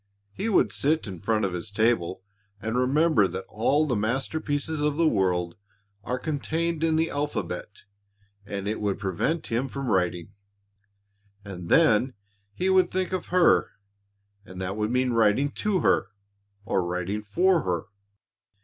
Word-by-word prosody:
He 200 - -3
would 205 - +3
sit 155 +3 +1
in 95 -5 -7
front 110 +2 0
of 95 - -2
his 90 +4 -3
table 100 -4 0 0.4
and 110 +3 -3
remember 130 -3 +3
that 95 +2 -6
all 140 +8 +2
the 130 -5 0
masterpieces 145 +7 -1
of 150 0 0
the 165 -1 +3
world 90 - 0 0.5
are 125 +4 -2
contained 160 +3 -2
in 160 -1 +2
the 160 +1 +1
alphabet 105 -10 -4 0.6
and 100 0 -5
it 110 +1 -2
would 100 -2 0
prevent 100 - -1
him 120 +4 -1
from 135 -3 -4
writing. 90 0 0 1.1
And 90 -4 -8
then 130 -5 +4 0.4
he 185 - -1
would 190 -1 +4
think 185 0 -2
of 185 - -3
her 180 -1 +3 0.7
and 95 -3 -11
that 95 +1 -3
would 105 0 -1
mean 125 +1 +1
writing 115 +5 +3
to 205 -4 -1
her - - +2 0.6
or 95 - 0
writing 90 +4 -3
for 175 - +2
her. 85 -3 -1
115 Hz, 150 wpm, -26 LUFS, 95-155 Hz, 1.1 s, then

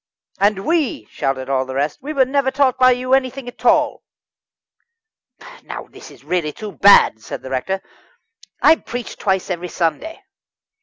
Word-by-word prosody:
"And 200 -1 +1
we," 310 - 0
shouted 135 -1 -2
the 130 -1 -1
rest 145 +2 -2
"we 290 +3 -5
were 275 -4 +3
never 270 +1 0
taught 265 -1 +1
by 255 0 +6
you 255 +1 0
anything 265 -1 0
at 245 - -11
all." - - +2 1.6
"Now - - -8
this - - -13
is - - -17
really 175 -4 -1
too 215 -1 -7
bad," 195 - +5
said - - -8
the 130 - -8
rector. 190 +9 -2 0.8
"I 320 - +7
preached 245 -4 -7
twice 190 -1 -1
every 180 0 -3
Sunday." 315 - -3
210 Hz, 155 wpm, -19 LUFS, 165-265 Hz, 1.6 s, I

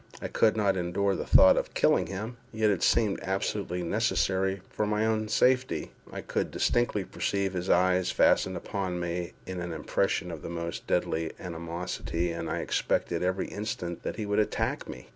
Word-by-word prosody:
I - - -5
could 110 -1 +3
not 100 -3 +2
endure 95 +3 0
the - - -4
thought - - +7
of - - -2
killing - - +3
him, 105 +5 -5
yet 110 -1 +2
it 95 - -1
seemed 105 -4 +3
absolutely 95 -1 -2
necessary 95 -1 +1
for 105 - -2
my 105 +1 +1
own 110 -1 0
safety. 130 +4 +2 0.2
I - - -5
could - - -2
distinctly 120 -4 +1
perceive 100 +1 -1
his 90 0 -3
eyes 90 0 +3
fastened - - +3
upon 95 -3 -3
me 85 0 -3
with 95 -1 -5
an 85 -1 -4
expression 90 +3 -1
of 80 -3 -7
the - - -6
most 85 0 -5
deadly 80 0 0
animosity, 85 0 -3
and 85 0 -4
I - - -1
expected 85 -1 0
every 95 +1 -1
instant 100 -5 -4
that - - -4
he 110 - -3
would 105 +1 +1
attack 105 - -1
me. 60 - -9
95 Hz, 180 wpm, -28 LUFS, 85-105 Hz, 0.2 s, thought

